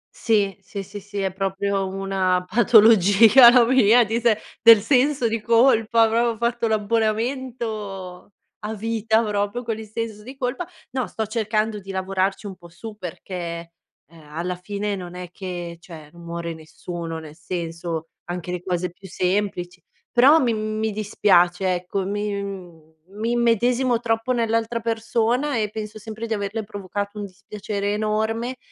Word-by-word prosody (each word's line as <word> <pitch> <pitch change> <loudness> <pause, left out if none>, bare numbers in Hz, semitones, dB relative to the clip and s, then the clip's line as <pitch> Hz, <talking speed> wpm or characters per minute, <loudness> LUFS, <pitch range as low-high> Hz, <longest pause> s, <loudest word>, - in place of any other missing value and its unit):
Sì, 205 -3 +1
sì, 200 +1 -7
sì, 200 +2 -9
sì, 205 +1 -7
è 190 -1 -1
proprio 195 +1 -1
una 190 -1 0
patologia 225 +1 +7
la 245 -2 +6
mia, 245 -1 +5
di 225 +2 -1
se 230 -2 +2 0.2
del 230 -2 +9
senso 265 +1 +2
di 225 -1 -2
colpa, 230 -1 +4
proprio 230 0 +1
fatto 235 0 0
l'abbonamento 220 -3 -2 0.3
a 215 +1 -5
vita 225 +1 0
proprio 210 +3 -2
con 225 -1 -3
il 220 - -8
senso 215 -1 -5
di 260 +4 -10
colpa. 270 +7 -3 0.2
No, 255 -1 -2
sto 220 -2 -4
cercando 215 -1 -1
di 195 0 -9
lavorarci 190 +1 -1
un 190 - -7
po' 170 -1 -15
su 210 +6 -9
perché, 185 0 -8
eh, 170 -1 -5 0.6
alla 175 +4 -3
fine 200 +3 -3
non 180 -2 -8
è 180 -1 -7
che, 175 -3 -6
cioè,, 160 -4 -12
non 170 0 -14
muore 170 0 -5
nessuno, 165 +1 -7
nel 155 -1 -11
senso 165 -1 -5 0.2
anche 180 0 -5
le 180 0 -4
cose 180 -1 -1
più 190 +2 -14
semplici, 180 0 -2 0.3
però 275 +6 +6
mi 245 -5 +1
mi 215 0 -2
dispiace, 190 -3 +2
ecco, 180 +2 -3
mi 200 -5 -5 0.2
mi 220 +4 -3
immedesimo 240 +1 +2
troppo 225 +2 0
nell'altra 230 0 0
persona 230 +4 0
e 210 -2 0
penso 215 0 -7
sempre 220 +2 -7
di 225 - -1
averle 210 +1 -3
provocato 205 +1 -5
un 205 - -4
dispiacere 200 +1 -4
enorme. 220 +4 -1
210 Hz, 155 wpm, -23 LUFS, 185-230 Hz, 0.6 s, del